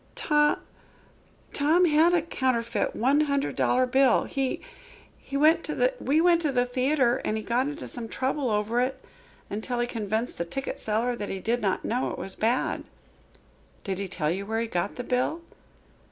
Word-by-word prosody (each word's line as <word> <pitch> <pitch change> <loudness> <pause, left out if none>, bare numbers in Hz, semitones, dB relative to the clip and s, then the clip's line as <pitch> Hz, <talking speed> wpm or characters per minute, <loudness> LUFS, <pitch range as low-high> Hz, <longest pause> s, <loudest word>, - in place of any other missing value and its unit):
"To 295 -1 +3 1.0
Tom 315 +5 +4
had 325 +2 +4
a 335 - +2
counterfeit 255 -7 -1
one 275 +5 +3
hundred 280 -2 0
dollar 255 +1 +2
bill. 260 -1 +4
He 270 -1 -2 0.7
we 275 - 0
went 310 +3 +4
to - - -3
the 330 - +2
theatre 260 -1 +2
and 215 - -1
he 220 - -4
got 245 +4 +1
into 295 +1 -6
some 235 -2 -7
trouble 265 +1 -1
over 215 +3 +1
it, 260 +1 -1 0.5
until 230 +4 -3
he 240 - +2
convinced 220 -1 -3
the 170 - -1
ticket 270 +11 -4
seller 230 +3 0
that 205 -3 -5
he 195 - -4
did 235 +5 -1
not 195 -3 -1
know 245 +3 0
it - - -5
was 190 - -6
bad." 235 +4 0 1.0
"Did 190 -1 -3
he 200 - -3
tell 160 -4 -1
you 190 +3 -2
where 220 +2 -2
he - - 0
got 180 -3 -2
the 245 - -5
bill?" 250 +7 -1
250 Hz, 170 wpm, -27 LUFS, 220-285 Hz, 1.0 s, Tom